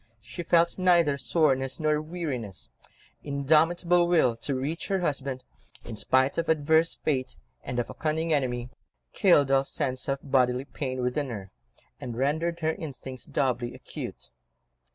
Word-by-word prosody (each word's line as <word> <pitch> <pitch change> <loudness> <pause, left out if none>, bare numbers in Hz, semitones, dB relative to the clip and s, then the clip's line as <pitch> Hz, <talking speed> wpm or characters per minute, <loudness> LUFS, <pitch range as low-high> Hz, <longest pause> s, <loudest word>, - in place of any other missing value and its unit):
She 115 +10 -8
felt 170 +1 +2
neither 170 -5 +4
soreness 135 -1 +1
nor 155 -1 +1
weariness; 150 - -5 0.5
indomitable 165 +5 +3
will 160 -9 +3
to 135 +4 -2
reach 145 +6 -3
her 195 -2 0
husband 140 -5 -2 0.4
in 115 - -6
spite 130 +7 +2
of 165 - -2
adverse 160 +1 +3
Fate, 130 -4 -2 0.3
and 120 - -4
of 120 - 0
a - - -8
cunning 160 +1 -1
enemy, 125 -3 -1 0.4
killed 145 -9 +4
all 135 0 +4
sense 130 -1 -2
of 135 0 0
bodily 130 -1 +2
pain 130 -3 -4
within 130 +3 -1
her, 100 -5 -7 0.5
and 120 -2 -6
rendered 160 +6 0
her 160 0 +1
instincts 135 -5 -7
doubly 125 -3 -1
acute. - - -8
140 Hz, 145 wpm, -27 LUFS, 130-160 Hz, 0.5 s, neither